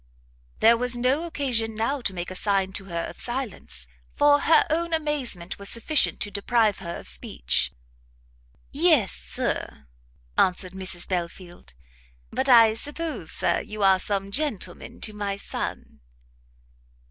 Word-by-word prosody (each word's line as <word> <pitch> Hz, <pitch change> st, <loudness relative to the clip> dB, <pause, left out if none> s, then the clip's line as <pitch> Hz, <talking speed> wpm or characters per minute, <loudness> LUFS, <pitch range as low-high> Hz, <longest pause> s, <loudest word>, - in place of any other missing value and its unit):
There 230 Hz, +1 st, +7 dB
was 250 Hz, 0 st, +1 dB
no 260 Hz, +7 st, +1 dB
occasion, 245 Hz, -9 st, -1 dB
now, 255 Hz, +6 st, -1 dB
to 210 Hz, -, -1 dB
make 175 Hz, +1 st, -4 dB
a -, -, -6 dB
sign 195 Hz, -1 st, 0 dB
to 195 Hz, 0 st, -4 dB
her 170 Hz, -3 st, -3 dB
of -, -, -9 dB
silence, 225 Hz, -, -3 dB, 0.3 s
for 290 Hz, 0 st, +5 dB
her 320 Hz, +3 st, +5 dB
own 335 Hz, +1 st, +1 dB
amazement 265 Hz, -, -3 dB
was 200 Hz, -, -5 dB
sufficient 280 Hz, +6 st, +2 dB
to 205 Hz, -, -2 dB
deprive 210 Hz, +1 st, +2 dB
her 170 Hz, -2 st, -5 dB
of -, -, -11 dB
speech. -, -, 0 dB, 1.0 s
"Yes, 295 Hz, -, +4 dB
Sir," 70 Hz, -, -4 dB, 0.5 s
answered 185 Hz, 0 st, +2 dB
Mrs 190 Hz, -2 st, -3 dB
Belfield; 175 Hz, -, -5 dB, 0.6 s
"but 270 Hz, -, 0 dB
I 230 Hz, -3 st, +8 dB
suppose, 295 Hz, +7 st, -5 dB
Sir, -, -, +1 dB
you 215 Hz, -1 st, -5 dB
are 190 Hz, -1 st, +6 dB
some 195 Hz, 0 st, -2 dB
gentleman 215 Hz, -, -2 dB
to 215 Hz, -, -2 dB
my 200 Hz, -1 st, -3 dB
son." -, -, -5 dB
215 Hz, 140 wpm, -25 LUFS, 185-270 Hz, 1.0 s, I